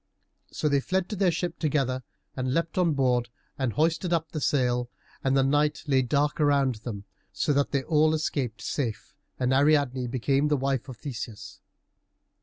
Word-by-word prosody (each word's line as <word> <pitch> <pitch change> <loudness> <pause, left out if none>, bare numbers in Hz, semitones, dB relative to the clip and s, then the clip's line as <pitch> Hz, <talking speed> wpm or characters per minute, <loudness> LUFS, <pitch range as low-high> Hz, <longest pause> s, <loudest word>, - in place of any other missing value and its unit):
So - - -1
they 140 -1 +3
fled 185 +5 -1
to 210 - -3
their 195 -2 +3
ship 170 +1 -2
together, 135 -5 0 0.3
and 130 0 -1
leapt 165 0 -1
on 170 -3 +3
board 125 -3 +1 0.3
and 130 -5 -1
hoisted 165 +3 +1
up 165 -2 0
the 155 - -4
sail, 125 -3 +1 0.3
and 135 0 +2
the 135 - +4
night 145 +2 +1
lay 135 -3 +3
dark 145 +4 0
around 140 -4 +3
them, 105 -5 -6 0.3
so 100 +10 0
that 140 0 +2
they 140 -2 0
escaped 155 -6 +1
all - - -7
safe, 120 -7 -3 0.3
and 125 0 +1
Ariadne 140 -3 +3
became 135 +4 +1
the 150 -1 +2
wife 135 -1 -1
of 125 - -8
Theseus. 110 -5 -7
140 Hz, 175 wpm, -27 LUFS, 125-150 Hz, 0.3 s, the